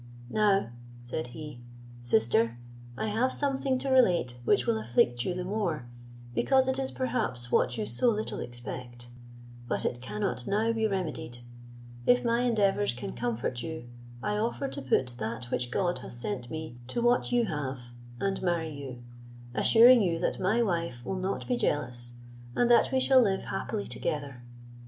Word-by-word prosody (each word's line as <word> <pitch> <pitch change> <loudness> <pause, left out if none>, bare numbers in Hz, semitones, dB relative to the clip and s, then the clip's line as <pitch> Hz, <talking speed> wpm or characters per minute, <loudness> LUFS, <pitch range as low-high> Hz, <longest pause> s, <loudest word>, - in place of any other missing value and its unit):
"Now," 200 - +2 0.3
said 120 +4 -4
he, 145 -1 -9 0.4
"sister, 115 0 +2 0.4
I - - -1
have 225 +5 +1
something 270 -2 0
to 270 - -3
relate 180 - +4
which 120 - +3
will 110 -2 +1
afflict 120 +2 +2
you 180 - -1
the 180 - -3
more, 180 - -2 0.5
because 265 - +3
it 265 0 +1
is 265 -1 -1
perhaps 125 - -1
what 120 - +2
you 110 - -1
so 120 - +2
little 215 -1 -2
expect; 120 0 -7 0.6
but - - -1
it 120 - -2
cannot 120 +1 -3
now 220 +3 +2
be 220 -1 +1
remedied; 160 - -3 0.7
if 245 0 +4
my 235 0 +2
endeavours 205 - +2
can 125 - -5
comfort 120 +1 -2
you, 160 -6 -6 0.3
I 210 0 0
offer 230 +5 -1
to - - -6
put 130 -1 +1
that 115 +2 -4
which 125 -1 -1
God 180 +5 0
hath - - -9
sent 120 0 -4
me 155 -6 -6
to 240 - -3
what 240 +1 +2
you 240 -1 +3
have, 130 - -4 0.3
and 195 -1 -1
marry 170 -3 0
you: 135 -4 -8 0.5
assuring 235 - +7
you 170 -4 +1
that - - -1
my 215 +6 +2
wife 170 - -2
will - - -2
not 190 +2 -3
be 245 - +1
jealous, 120 - -1 0.4
and 245 0 +3
that 240 - +5
we 265 - +3
shall 260 0 +6
live 195 -4 +1
happily 200 +2 -3
together. 140 -4 -4
165 Hz, 165 wpm, -29 LUFS, -, 0.7 s, assuring